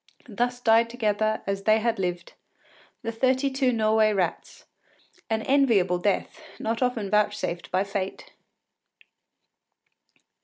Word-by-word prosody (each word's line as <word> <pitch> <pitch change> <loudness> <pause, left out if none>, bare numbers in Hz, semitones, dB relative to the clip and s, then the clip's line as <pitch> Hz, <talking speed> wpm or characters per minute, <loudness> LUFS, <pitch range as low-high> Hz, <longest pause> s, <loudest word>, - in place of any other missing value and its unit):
Thus 245 +2 -2
died 230 -1 +4
together, 215 -2 -1
as 195 0 -3
they 215 0 +5
had 230 -1 -1
lived, 175 -2 -3 0.7
the 230 - -2
thirty 260 +4 +1
two 265 -1 +1
Norway 215 -1 +2
rats, 190 -3 -3 0.6
an 220 0 -1
enviable 225 -11 +3
death, 205 - -1 0.2
not 225 +2 -3
often 235 -6 -1
vouchsafed 210 -4 0
by 185 +1 +1
fate! 195 -1 -5
220 Hz, 115 wpm, -25 LUFS, 200-240 Hz, 0.7 s, they